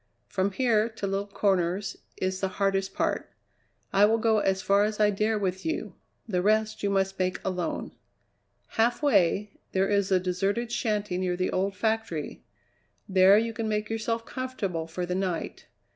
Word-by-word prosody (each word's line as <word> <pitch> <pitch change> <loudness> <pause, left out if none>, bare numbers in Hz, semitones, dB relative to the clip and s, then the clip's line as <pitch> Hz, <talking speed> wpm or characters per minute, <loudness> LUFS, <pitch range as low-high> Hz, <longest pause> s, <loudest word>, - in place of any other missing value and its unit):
From 190 +1 0
here 230 -2 +2
to 220 -3 -5
Little 195 +1 -1
Corners 195 -1 0 0.2
is 185 0 -1
the 190 - 0
hardest 195 0 -1
part. - - -1 0.6
I 200 +1 +6
will 220 +2 +3
go 220 -1 +3
as 190 -1 0
far 200 +1 +4
as 215 0 -1
I 210 -1 +4
dare 215 +2 +1
with 190 -2 -2
you; 175 +4 -3 0.3
the 180 -5 0
rest 215 +2 +1
you 200 - 0
must 195 -1 0
make 185 0 0
alone. 180 -3 -2 0.8
Halfway, 210 - +2
there 190 +1 +2
is 200 -1 +1
a 185 - +5
deserted 195 +6 -1
shanty 210 -6 -1
near 180 -1 -1
the 185 - 0
old 195 +1 0
factory; 220 -7 -2 0.6
there 190 +1 +6
you 230 +1 0
can 225 -1 -3
make 210 0 -1
yourself 230 +1 -2
comfortable 200 -11 -3
for 175 +2 -4
the 180 - -3
night. 185 -2 -3
200 Hz, 165 wpm, -27 LUFS, 185-215 Hz, 0.8 s, I